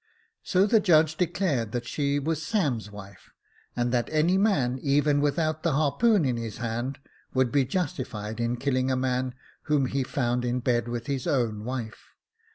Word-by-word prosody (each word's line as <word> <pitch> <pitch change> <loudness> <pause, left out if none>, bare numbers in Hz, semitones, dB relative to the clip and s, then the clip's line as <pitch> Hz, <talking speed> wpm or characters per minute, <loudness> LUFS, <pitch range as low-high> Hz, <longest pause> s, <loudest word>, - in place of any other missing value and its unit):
So 185 +1 +2
the 220 +2 +4
judge 160 -5 +4
declared 165 - -1
that 120 -1 -2
she 140 +2 -1
was 155 +2 -1
Sam's 145 - -1
wife, 100 -2 -12 0.5
and 120 0 0
that 120 -1 0
any 155 +4 +3
man, 145 - +2
even 145 0 +2
without 155 +1 0
the 170 - +1
harpoon 160 +7 +3
in 125 -3 0
his 115 -2 -5
hand, 120 +4 -3 0.4
would 130 -2 +2
be 140 -2 +3
justified 125 - -3
in 120 +1 -1
killing 130 0 0
a 130 - +2
man 130 0 -1 0.3
whom 150 -3 +2
he 135 +2 -1
found 125 -2 -1
in 125 +1 0
bed 120 -1 0
with 120 -1 -4
his 140 +1 -3
own 115 -8 0
wife. 120 -3 -6
130 Hz, 170 wpm, -27 LUFS, 120-155 Hz, 0.5 s, the